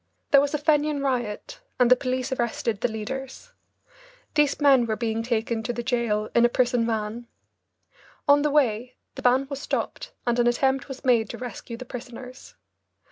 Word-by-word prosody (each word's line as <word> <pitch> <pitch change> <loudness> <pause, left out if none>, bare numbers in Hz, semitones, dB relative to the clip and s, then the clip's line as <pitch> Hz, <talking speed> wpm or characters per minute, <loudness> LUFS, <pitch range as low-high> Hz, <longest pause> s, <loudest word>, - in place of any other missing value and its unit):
There 280 - +7
was 285 +1 -1
a - - +2
Fenian 295 -1 +1
riot, 255 - -2 0.2
and 250 -1 +4
the - - +10
police 255 0 -2
arrested 235 -3 -1
the 245 - +3
leaders. 265 - -6 0.8
These 295 -2 +2
men 270 -5 +5
were 220 - 0
being 225 -1 -2
taken 230 -1 -1
to 225 +2 -3
the 240 - -4
jail 230 -4 0
in 235 - +4
a 240 - +5
prison 245 -1 +1
van. 225 +1 -3 1.0
On 285 0 +6
the 300 - +2
way 250 -4 +1 0.2
the - - -8
van 255 +2 +3
was 280 0 -6
stopped - - -3
and 240 0 +1
an 240 - +4
attempt 265 +3 +1
was 270 -1 -9
made 235 -4 +3
to - - -6
rescue 245 -1 -7
the 255 - -8
prisoners. 250 +1 -9
245 Hz, 180 wpm, -25 LUFS, 235-270 Hz, 1.0 s, the